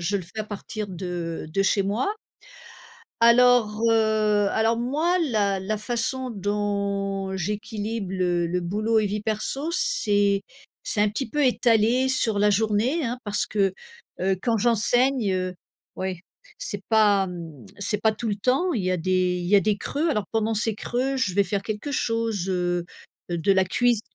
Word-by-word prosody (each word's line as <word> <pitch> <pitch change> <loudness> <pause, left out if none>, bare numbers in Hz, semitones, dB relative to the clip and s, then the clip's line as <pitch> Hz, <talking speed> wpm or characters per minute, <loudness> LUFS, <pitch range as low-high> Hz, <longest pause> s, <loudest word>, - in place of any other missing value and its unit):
je 195 +4 0
le 190 - -4
fais 215 +6 -7
à - - -3
partir 210 0 -6
de 175 -3 -5
de 195 +3 +2
chez 195 +1 +2
moi. 215 - -1 1.1
Alors 235 -2 +5
heu, 215 -2 +2
alors 225 +1 +2
moi 310 +9 +1
la 210 - +1
la 210 +3 -2
façon 245 +3 -2
dont 200 -1 -2
j'équilibre 210 +1 -4
le 175 -2 0
le 180 +2 -1
boulot 215 +5 +1
et 210 - 0
vie 210 +1 -2
perso 225 +9 -2
c'est 205 - +1 0.4
c'est 205 - -1
un 210 - +4
petit 255 +6 -3
peu 295 -2 +1
étalé 240 +1 +3
sur 230 -5 +1
la 205 +1 +4
journée 220 - +1
hein. 245 +1 -3
Parce 205 -1 0
que, 195 -3 0 0.5
heu, 190 +1 +1
quand 230 -2 +1
j'enseigne 240 0 +2
heu, 185 0 -2 0.4
oui, 185 -2 -3 0.4
c'est 205 - -4
pas 210 -3 +4
mmh, 165 - -9
c'est 205 +1 0
pas 220 - +3
tout 225 +2 -4
le 205 - -1
temps, 270 - +1
il 215 -8 -1
y 185 - +1
a 185 - +1
des 180 +1 +1
il 175 - -4
y 205 - +6
a - - +6
des 210 0 +1
creux. 295 +10 -2
Alors 210 -9 -1
pendant 225 0 0
ces 215 0 0
creux, 255 +5 -2
je 190 -9 0
vais 200 - +4
faire 195 +1 -2
quelque 215 +6 -4
chose 230 -7 -1
heu, 175 -1 0 0.5
de 170 +3 0
la 190 -1 +3
cuisi 240 +4 +2
210 Hz, 175 wpm, -24 LUFS, 195-230 Hz, 1.1 s, y